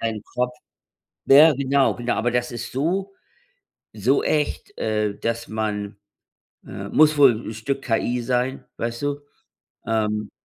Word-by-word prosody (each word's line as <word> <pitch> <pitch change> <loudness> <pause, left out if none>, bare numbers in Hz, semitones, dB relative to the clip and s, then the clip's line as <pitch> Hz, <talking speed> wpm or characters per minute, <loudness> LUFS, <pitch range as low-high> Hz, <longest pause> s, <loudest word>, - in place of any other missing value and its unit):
dein 110 -2 -3
Kopf. 125 0 -1 0.7
Ja, 150 +4 +8
genau, 140 0 +2
genau, 120 0 -2
aber 120 +2 0
das 120 0 -1
ist 120 - -6
so, 185 +9 -1 0.8
so 115 +6 +1
echt, 150 -1 -1
äh, 105 -2 -1
dass 115 0 -3
man, 105 -2 -3 0.7
äh - - -7
muss 155 0 +4
wohl 135 -3 +7
'n 110 - -5
Stück 135 +6 -3
KI 120 +1 0
sein, 125 +2 -1
weißt 115 +2 -4
du? 145 0 -2 0.7
Ähm. 105 -1 -1
120 Hz, 140 wpm, -23 LUFS, 110-140 Hz, 0.8 s, Ja